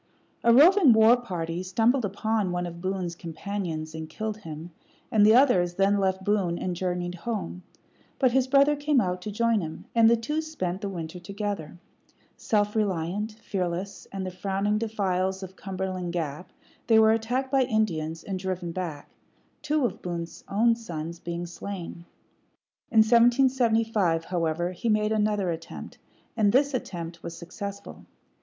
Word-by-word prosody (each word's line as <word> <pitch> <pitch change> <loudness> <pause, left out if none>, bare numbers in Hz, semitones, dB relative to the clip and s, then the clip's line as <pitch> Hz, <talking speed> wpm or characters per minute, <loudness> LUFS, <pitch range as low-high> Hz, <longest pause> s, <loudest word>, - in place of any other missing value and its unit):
A 235 - +5
roving 310 - +7
war 220 +2 +7
party 175 -8 -4
stumbled 225 +7 +2
upon 205 0 -1
one 175 0 -1
of 170 0 -7
Boone's 185 -2 -2
companions 165 -2 -5
and 160 0 -6
killed 215 +5 -4
him, 165 -4 -8 0.4
and 215 -2 +5
the 215 +2 +7
others 185 -10 +4
then 195 +2 +3
left 190 -1 0
Boone 195 -5 +1
and 180 0 -3
journeyed 180 0 -2
home; 180 -2 -4 0.6
but 255 -3 +3
his 260 +1 +2
brother 280 +2 +5
came 290 -1 +2
out 180 -4 -1
to 210 - -5
join 230 0 +2
him, 160 -1 -7
and 230 -1 +6
the 235 - +5
two 300 +8 -2
spent 195 - -4
the 200 - -3
winter 170 -2 -6
together. 200 -3 -5 0.6
Self 210 -1 0
reliant, 200 +1 -1
fearless, 190 -3 -4
and 195 -1 -4
the 185 - -4
frowning 195 +3 -1
defiles 190 -4 -1
of 190 0 -9
Cumberland 185 -2 -4
Gap, 165 0 -4 0.4
they 225 - +5
were 220 0 +6
attacked 245 +4 -1
by 270 -1 +4
Indians, 170 -10 -1
and 190 -2 -4
driven 185 -2 -3
back 165 -5 -5 0.5
two 300 -2 +1
of - - -3
Boone's 170 -2 -5
own 230 +4 +3
sons 170 -7 -6
being 170 0 -4
slain. 175 -1 -7 0.8
In 220 - +6
1775, 230 -7 +3
however, 175 0 -1
he 185 +6 -3
made 215 0 +2
another 210 -4 +1
attempt; 165 0 -8 0.4
and 210 -3 +3
this 280 +4 +3
attempt 170 -8 -5
was 170 0 -7
successful. 200 +4 -8
195 Hz, 155 wpm, -26 LUFS, 175-225 Hz, 0.8 s, roving